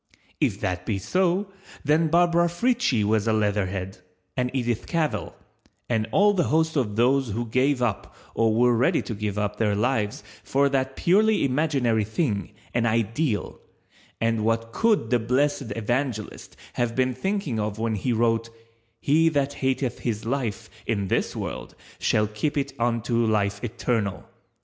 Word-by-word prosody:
If - - +1
that 90 -1 -2
be 100 +1 -1
so 185 - 0 0.3
then 155 +3 +3
Barbara 170 +1 +3
Frietchie 225 - +1
was 110 +1 +1
a 110 - +3
leatherhead, 100 -3 -1 0.4
and 125 0 0
Edith 120 -3 -2
Cavell, 165 -3 -1 0.5
and 110 -2 0
all 205 +1 +4
the 175 -5 +1
host 160 +1 +1
of 115 -8 0
those 130 +2 +2
who 115 +4 -2
gave 130 +3 +1
up 110 -5 -2 0.2
or 115 -1 +2
were 120 +1 +4
ready 120 +2 +2
to 115 - -5
give 105 -1 -3
up 105 0 -1
their 105 -2 +1
lives 105 -1 0 0.2
for 140 +1 +2
that 135 -1 -1
purely 210 +1 +3
imaginary 130 -5 +1
thing, 110 - -1 0.2
an 120 -1 +1
ideal, 115 +1 -1 0.6
and 115 -1 +1
what 115 +1 0
could 215 - +2
the 125 - +4
blessed 130 +1 0
Evangelist 115 0 -3 0.2
have 120 -1 -1
been 130 0 +1
thinking 155 - -2
of 105 0 -2
when 115 0 -1
he 110 +4 -1
wrote 115 0 +1 0.5
"_He 160 +3 +4
that 140 -1 +1
hateth 130 -1 0
his 110 -3 -3
life 115 -4 -2 0.2
in 100 -4 -1
this - - 0
world - - -5 0.2
shall 105 - +2
keep 105 +9 -2
it 140 - -1
unto 115 0 +1
life 100 -2 0
eternal. 115 -4 -2
120 Hz, 155 wpm, -25 LUFS, 110-140 Hz, 0.6 s, all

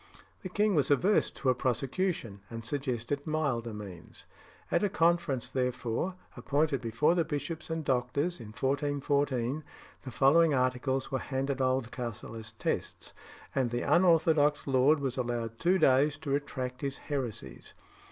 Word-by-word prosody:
The 185 - -6
king 210 +2 +2
was 145 -6 +2
averse 180 +9 +3
to 135 - -2
a - - +5
prosecution, 125 - -2
and 115 -1 -7
suggested 135 +1 -3
milder 140 -7 -1
means. 100 -5 -9 0.5
At 170 - +2
a 205 - +2
conference, 165 -7 +1
therefore, 125 +6 -1 0.2
appointed 140 +3 0
before 115 +8 +2
the 175 -1 +2
bishops 160 +2 -4
and 160 -1 -3
doctors 140 +6 0
in 115 - -9
1414, 140 +1 0 0.4
the 130 - -7
following 150 +4 +4
articles 130 +1 0
were 130 - 0
handed 135 0 -2
Oldcastle 125 -3 -2
as 110 -1 -8
tests, 110 - -3 0.4
and 130 -3 +1
the 120 +1 -2
unorthodox 160 -4 +4
lord 135 +3 +4
was 135 -2 -2
allowed 120 -2 -3
two 180 +3 +3
days 140 -1 +4
to 140 - -5
retract 130 -3 -3
his 140 -1 -3
heresies. 120 - -5
135 Hz, 140 wpm, -30 LUFS, 125-155 Hz, 0.5 s, a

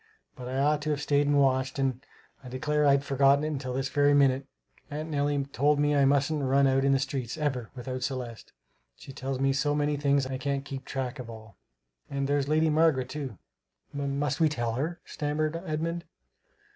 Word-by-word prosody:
But 125 -3 -8
I 130 +1 -3
ought 150 +2 +2
to 155 - -3
have 150 -2 0
staid 145 0 +2
and 145 0 +3
watched 130 -1 +2
and 135 -1 -1 0.4
I 125 - -9
declare 150 +3 +1
I'd 140 0 +4
forgotten 140 +1 +3
it 155 -2 -2
till 130 -2 -4
this 135 +1 -1
very 145 0 +3
minute 135 -1 +3 0.4
aunt 155 +2 -5
Nellie 145 -1 +1
told 145 +4 +2
me 145 0 +2
I 140 -1 +4
mustn't 145 +2 +2
run 135 +1 +3
out 135 0 +3
in 140 - +3
the 135 - +4
streets, 135 -1 -3
ever, 130 -7 -2
without 130 +1 -5
Celeste; 125 -3 -5 0.4
she 135 - -12
tells 135 -1 -4
me 135 0 +2
so 145 +2 +1
many 145 0 0
things 140 -1 +2
I 130 0 -4
can't 140 0 -2
keep 135 -1 -7
track 135 0 -4
of 120 -2 -7
all. 110 -3 -11 0.5
And 140 -1 -2
there's 145 -1 +1
Lady 155 +1 +2
Margaret 150 -5 +3
too" 135 -7 -5 0.6
"M 140 -1 -2
must 145 +1 -1
we 160 -2 +4
tell 120 -5 -2
her?" 160 +8 -3
stammered 150 +1 -2
Edmund. 165 +2 -2
140 Hz, 200 wpm, -28 LUFS, 130-145 Hz, 0.6 s, I'd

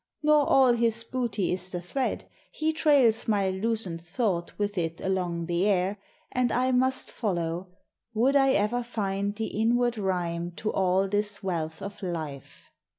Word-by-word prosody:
Nor 300 -1 +4
all 260 -2 +6
his 230 -1 +1
booty 230 -7 -1
is 185 0 -2
the 180 - -4
thread; 250 +10 -3 0.2
he 315 +1 -1
trails 275 -8 +3
My 200 -3 +2
loosened 190 -4 -1
thought 175 -1 -2
with 205 0 -1
it 165 -2 -2
along 180 -3 -1
the 175 +3 +1
air, 195 0 +1 0.3
And 250 -1 +1
I 255 +1 +2
must 260 +1 +1
follow, 175 -4 -2 0.5
would 255 +6 +3
I 270 -1 +5
ever 210 +4 +1
find 200 -4 -2
The 220 +1 -2 0.2
inward 240 0 +2
rhyme 175 -3 -2
to 215 +5 -3
all 190 +1 +2
this 205 +1 -2
wealth 160 -4 -3
of 200 +1 -7
life. 160 -7 -6
205 Hz, 155 wpm, -27 LUFS, 180-240 Hz, 0.5 s, all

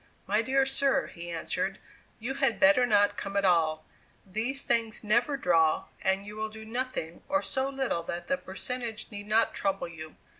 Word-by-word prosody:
"My 210 +3 +2
dear 270 +3 +2
sir," 270 0 +2
he 170 -1 -8
answered, 165 -1 -2 0.4
"you 245 +4 -4
had 270 -4 +1
better 200 +6 +6
not 205 -2 +3
come 200 0 -3
at 200 - +2
all; 160 -3 +2 0.4
these 230 +8 -2
things 230 -2 +1
never 240 +7 +2
draw, 165 -9 +2
and 190 +1 +1
you 210 +1 -8
will 220 0 -3
do 220 0 -10
nothing, 235 -8 -3
or 290 0 +2
so 265 0 -1
little 265 -10 -1
that 175 0 -4
the 275 - +1
percentage 230 +2 -4
need 205 0 -7
not 220 +2 +3
trouble 195 -2 -1
you." 155 -2 -10
215 Hz, 180 wpm, -29 LUFS, 190-255 Hz, 0.4 s, better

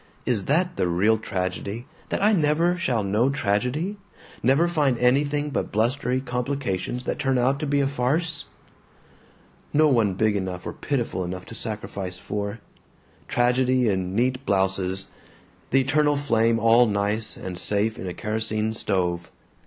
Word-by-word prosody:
Is 110 -6 0
that 175 +4 +1
the - - +1
real 100 +6 +2
tragedy, 100 +3 -3 0.2
that - - -1
I 215 +1 +5
never 165 +1 +2
shall 130 - 0
know 105 +6 +2
tragedy, 140 - -1 0.4
never 140 +7 +3
find 145 -7 +1
anything 145 +4 +2
but - - -2
blustery 125 +4 +1
complications 125 -3 -2
that - - -3
turn 135 -2 +1
out 130 +3 +2
to 155 - -2
be 140 0 +2
a 135 - +2
farce? 145 +5 -1 1.3
"No 155 +1 +5
one 110 -8 +2
big 110 +1 +2
enough 95 -2 -3
or - - -4
pitiful 120 -9 -2
enough 90 +1 -5
to - - -10
sacrifice 100 -5 -5
for. 100 +3 -4 0.7
Tragedy 125 0 +2
in 95 -1 -1
neat 130 +3 +1
blouses; 95 -2 0 0.6
the 135 - +4
eternal 145 +2 +2
flame 115 -5 +2
all 115 +2 +5
nice 105 +1 -1
and 90 -1 -5
safe 105 +2 +1
in 95 - -5
a 90 - -4
kerosene 110 0 -1
stove. 90 -5 -1
120 Hz, 150 wpm, -24 LUFS, 100-140 Hz, 1.3 s, I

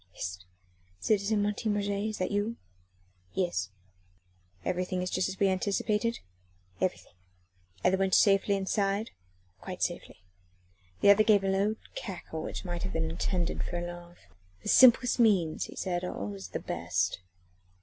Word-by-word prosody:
"Hist! 90 +1 -6 0.5
citizen 205 - +1
Martin 210 +1 0
Roget, 205 0 -1
is 215 - -5
that 185 - -2
you?" 205 +3 -1 0.8
"Yes." 175 - 0 1.0
"Everything 180 0 -1
just 185 0 0
as 190 - -7
we 200 - +4
anticipated?" 210 +4 0 0.6
"Everything." - - -2 0.7
"And 185 - +4
the 190 - +2
wench 190 -1 +3
safely 200 0 +4
inside?" 200 +2 0 0.5
"Quite - - -5
safely." 90 - -4 0.8
The 200 - +8
other 210 +2 +6
gave 210 -2 +4
a - - 0
low 195 +3 +1 0.2
cackle, 175 -5 -6
which - - -5
might 175 -1 -4
have 95 - -3
been 80 0 -1
intended 170 - -1
for 175 - -4
a 175 - -3
laugh. 175 0 -9 0.5
"The - - -3
simplest 250 -1 +6
means," 190 -9 +3
he - - -11
said, 180 -2 -2
"are 180 - -4
always 100 -1 -5
the 90 - -4
best." - - -1
195 Hz, 150 wpm, -29 LUFS, 175-205 Hz, 1.0 s, The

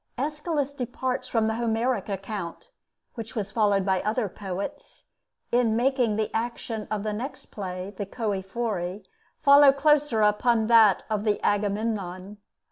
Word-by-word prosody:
Aeschylus 295 +1 -2
departs 255 0 -3
from 225 -2 +1
the 220 - +1
Homeric 235 +1 -1
account, 195 - -5 0.4
which 230 +1 -8
was 205 -3 -3
followed 205 -3 +2
by 190 -2 +1
other 215 +2 0
poets, 190 0 -7 0.5
in 235 -2 +3
making 245 -2 +2
the 215 0 -2
action 225 -1 -3
of 215 -2 -2
the 215 -1 -2
next 250 +7 -6
play, 185 -1 -5
the 200 0 -4
'Choëphori,' 200 -2 -3 0.4
follow 280 -1 +8
closer 285 -4 +2
upon 220 +2 +3
that 220 -4 +5
of 215 -2 -1
the 210 -2 +1
'Agamemnon.' 205 -2 -1
220 Hz, 135 wpm, -26 LUFS, 200-245 Hz, 0.5 s, follow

